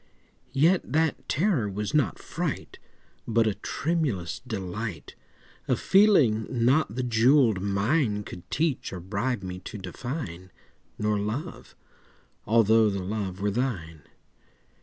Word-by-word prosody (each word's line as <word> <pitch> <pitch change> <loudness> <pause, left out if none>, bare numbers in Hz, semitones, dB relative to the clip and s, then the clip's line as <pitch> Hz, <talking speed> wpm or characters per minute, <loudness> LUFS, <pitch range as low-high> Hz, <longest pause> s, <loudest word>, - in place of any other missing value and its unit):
Yet 165 +7 +4
that 160 -1 0
terror 150 - +1
was 105 +1 -4
not 150 -7 +2
fright, - - -4 0.5
But 115 0 +3
a 110 - +1
tremulous 140 - -2
delight— 105 -4 -5 0.5
A - - +3
feeling 155 - +4
not 125 0 +2
the 130 - -1
jewelled 120 -2 +4
mine 105 +3 +1
Could 90 -3 -10
teach 155 -4 -1
or 95 - -5
bribe 100 +5 -2
me 90 0 -5
to 105 - -8
define— 95 - -6 0.5
Nor 105 -1 0
Love—although 110 - -1
the 100 -2 -3
Love 100 -1 -4
were 105 0 +1
thine. 95 - -3
110 Hz, 115 wpm, -27 LUFS, 100-135 Hz, 0.5 s, Yet